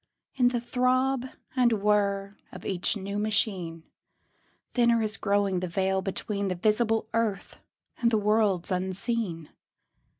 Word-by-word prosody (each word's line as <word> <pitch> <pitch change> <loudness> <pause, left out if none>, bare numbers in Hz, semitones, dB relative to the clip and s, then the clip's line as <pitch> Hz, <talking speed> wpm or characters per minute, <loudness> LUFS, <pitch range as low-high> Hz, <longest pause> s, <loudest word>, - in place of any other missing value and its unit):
In 250 -2 +3
the 245 -1 +1
throb 255 +2 +1 0.3
and 245 -3 +4
whir 200 -1 +1 0.2
of - - -10
each 190 +3 +1
new 200 +1 -4
machine 195 -6 -1 0.9
Thinner 235 -1 +4
is 215 0 -1
growing 200 -3 +1
the 185 - -3
veil 190 +2 0
between 200 +1 -3
The 185 - -1
visible 220 +4 +1
earth 225 -3 -1 0.4
and 235 - +4
the 225 - +2
worlds 210 -4 +1
unseen. 185 -2 -2
205 Hz, 130 wpm, -27 LUFS, 190-230 Hz, 0.9 s, and